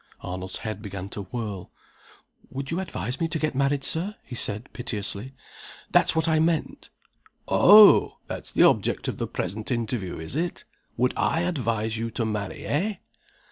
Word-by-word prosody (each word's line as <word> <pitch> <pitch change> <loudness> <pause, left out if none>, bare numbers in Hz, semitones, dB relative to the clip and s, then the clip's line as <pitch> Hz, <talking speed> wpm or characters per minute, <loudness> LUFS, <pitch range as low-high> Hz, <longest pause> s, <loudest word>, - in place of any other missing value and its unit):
Arnold's 90 +1 -4
head 110 -2 -4
began 100 -2 -6
to 100 0 -7
whirl. 105 -3 -6 0.8
"Would 135 +2 -6
you 165 - -1
advise 130 - -4
me 165 - +2
to 165 - -2
get 155 -1 -1
married, 140 +1 +1
Sir?" 185 +9 +2
he 130 - -11
said, 110 +1 0
piteously. 115 +1 -3 0.6
"That's - - +4
what 160 -1 +1
I 160 -1 +3
meant." 160 -1 -1 0.6
"Oh! 210 +1 +7
That's - - -5
the - - +4
object - - +2
of - - -4
the - - -2
present 105 +3 -4
interview, 115 -6 -2
is 80 +10 -6
it? 170 +3 -2 0.3
Would 125 +1 +2
I 165 - +1
advise 115 -10 -1
you 115 0 -2
to 115 - 0
marry, 105 -3 -4
eh?" 200 +9 0
125 Hz, 165 wpm, -25 LUFS, 105-160 Hz, 0.8 s, Oh